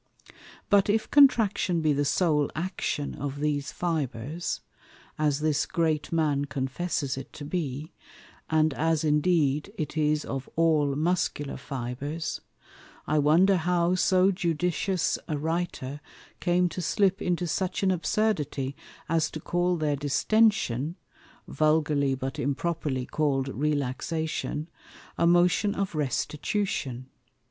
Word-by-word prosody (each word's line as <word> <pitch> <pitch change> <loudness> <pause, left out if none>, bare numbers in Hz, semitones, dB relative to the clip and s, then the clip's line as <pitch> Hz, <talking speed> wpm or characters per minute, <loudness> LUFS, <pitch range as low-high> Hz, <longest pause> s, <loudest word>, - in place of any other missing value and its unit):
But 200 0 +5
if 220 +1 +1
Contraction 225 -10 +4
be 155 -1 +3
the 145 +1 0
sole 150 -2 +2
Action 155 -3 -2
of 145 0 -5
these 145 -1 -1
Fibres 155 -2 -3 0.6
(as 150 -1 +1
this 150 -2 +1
Great 160 -3 0
Man 150 -4 +1
confesses 140 +1 -2
it 135 - -7
to 145 - -8
be) 150 -2 -4 0.6
and 155 -1 +3
as 160 +2 +1
indeed 150 +1 +2
it 155 -1 -4
is 150 -1 +1
of 135 -1 -5
all 155 -4 +3
Muscular 155 -2 -1
Fibres, 140 +5 -4 0.6
I 155 0 +2
wonder 175 +7 +5
how 175 +1 +1
so 185 +1 +4
judicious 180 +1 0
a 150 - -1
Writer 155 -3 -3 0.4
came 180 +1 +2
to 180 - -5
slip 195 +3 +1
into 175 0 0
such 185 +3 -2
an 190 - +4
Absurdity, 165 - -1 0.3
as 165 0 +1
to 155 - -6
call 175 +2 0
their 150 -2 0
Distention 150 - +2 0.5
(vulgarly 150 -3 +2
but 130 +1 -5
improperly 140 -1 -1
call'd 135 -3 0
Relaxation) 150 +2 -2 0.5
a 170 - +4
Motion 180 +4 +3
of 195 -2 -2
Restitution. 145 - -2
155 Hz, 120 wpm, -27 LUFS, 145-175 Hz, 0.6 s, But